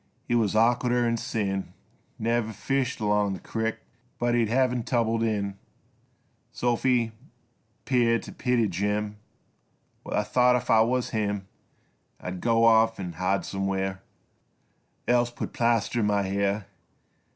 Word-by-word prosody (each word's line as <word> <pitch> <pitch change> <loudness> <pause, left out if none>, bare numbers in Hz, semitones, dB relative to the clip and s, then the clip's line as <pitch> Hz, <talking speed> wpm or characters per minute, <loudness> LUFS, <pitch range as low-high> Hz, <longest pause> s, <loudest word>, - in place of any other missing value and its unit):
He - - 0
wuz 110 -4 +2
awkarder 120 +2 +3
'n' 115 0 +1
sin, 100 -4 -3 0.4
Never 115 0 0
fished 135 +4 -1
along 105 -2 +1
the 95 - -6
crick 115 0 -3 0.4
But 120 0 0
he'd 115 -3 +2
hev 130 +1 +3
t' 125 - -1
tumble 115 -1 0
in. 100 -3 -1 0.9
Sophy 120 -1 +1 0.7
'peared 120 -3 +2
t' - - -9
pity 120 -3 +1
Jim 105 +3 -2 0.8
While - - -3
I - - +2
thought 125 0 +3
if 125 +1 -1
I 110 -1 +6
wuz 125 +2 +1
him 105 -3 -2 0.7
I'd 90 0 -6
go 115 -1 +3
off 115 -1 +4
'n' 90 -3 -5
hide 90 +3 0
somewhere 95 -1 -2 1.1
Else 120 0 +3
put 120 - -6
plaster 120 0 +1
on 105 - +2
my 100 -1 +2
hair. 100 +1 -1
115 Hz, 140 wpm, -26 LUFS, 100-120 Hz, 1.1 s, I